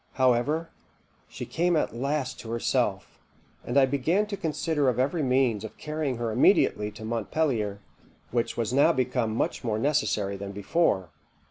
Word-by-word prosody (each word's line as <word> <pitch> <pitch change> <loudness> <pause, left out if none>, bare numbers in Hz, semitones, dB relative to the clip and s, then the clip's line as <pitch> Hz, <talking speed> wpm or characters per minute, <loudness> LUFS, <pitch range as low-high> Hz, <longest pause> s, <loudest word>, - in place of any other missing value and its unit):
However, 130 +6 +1 0.6
she - - -6
came 175 +1 +1
at 150 - 0
last 140 +2 -2
to 115 - -9
herself, 115 0 -1 0.4
and 120 - -1
I 135 - +7
began 150 +10 +1
to 210 -1 -4
consider 155 -4 0
of 125 - -1
every 140 +6 +1
means 125 -5 +2
of 110 - -8
carrying 150 -4 -3
her 115 -1 -2
immediately 105 -1 +3
to 110 0 -9
Montpelier, 115 -2 -1 0.5
which 120 -1 -1
was 115 0 -1
now 140 +2 +5
become 125 -3 0
much - - -1
more 110 -3 -1
necessary 110 -7 0
than 100 0 -6
before. 100 - +1
125 Hz, 155 wpm, -27 LUFS, 110-150 Hz, 0.6 s, I